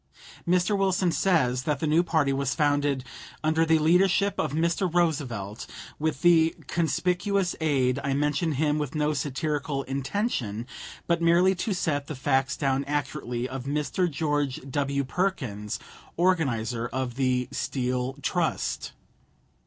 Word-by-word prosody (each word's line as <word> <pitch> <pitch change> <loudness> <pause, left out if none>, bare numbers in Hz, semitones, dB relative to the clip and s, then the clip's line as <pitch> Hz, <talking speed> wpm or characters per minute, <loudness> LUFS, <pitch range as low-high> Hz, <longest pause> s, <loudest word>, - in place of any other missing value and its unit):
Mr. 180 +3 +3
Wilson 190 -2 +2
says 150 -9 +2
that 145 +1 -1
the - - -1
new 155 +2 +4
party 155 -5 +1
was 140 0 -1
founded 145 -3 +1 0.4
"under 160 +1 +3
the 160 0 +5
leadership 180 +5 +3
of 155 - 0
Mr. 170 +4 0
Roosevelt, 135 - -1 0.3
with 155 -1 -2
the 165 -2 +5
conspicuous 180 +3 0
aid 135 -4 +2
I 140 -1 0
mention 150 +3 +1
him 150 +1 +1
with 150 0 -3
no 150 0 +1
satirical 145 0 -2
intention, 135 - -2 0.4
but 170 0 +1
merely 170 +3 +4
to 190 +2 -2
set 145 -5 -1
the 155 - -5
facts 135 0 +1
down 135 -1 +1
accurately 135 -4 -2
of 130 -1 -6
Mr. 150 +5 0
George 145 -2 -1
W. 140 0 -1
Perkins, 125 - -2 0.4
organizer 125 -10 +1
of 125 0 -3
the 125 -1 0
Steel 125 -1 -2
Trust." - - -1
145 Hz, 135 wpm, -26 LUFS, 135-170 Hz, 0.4 s, the